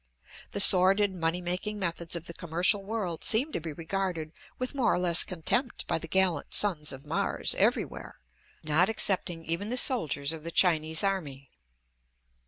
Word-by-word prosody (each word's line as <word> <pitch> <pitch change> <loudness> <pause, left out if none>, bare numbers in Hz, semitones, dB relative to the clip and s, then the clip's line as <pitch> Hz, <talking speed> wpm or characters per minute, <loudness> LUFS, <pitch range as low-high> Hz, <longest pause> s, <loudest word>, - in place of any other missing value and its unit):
The - - -3
sordid 195 +1 +6
money 170 0 -2
making 185 +4 -4
methods 170 -3 -3
of 170 -1 -6
the 170 - -6
commercial 175 +5 +2
world 195 -5 -4
seem 250 +7 +5
to - - -3
be 160 0 -7
regarded 165 0 -4 0.3
with 255 +2 -5
more 255 -5 +1
or - - 0
less 175 -1 +3
contempt 225 - -2
by - - -2
the 165 - -8
gallant 180 -4 0
sons 165 -8 +2
of 135 +2 -10
Mars 150 - -2
everywhere, - - -1 0.5
not 160 +5 +1
excepting 180 -6 -2
even 170 +6 -4
the 250 - -2
soldiers 160 - +1
of 160 -2 -10
the 165 - -6
Chinese 160 -2 +1
army. 145 -9 -4
175 Hz, 165 wpm, -27 LUFS, 160-200 Hz, 0.5 s, sordid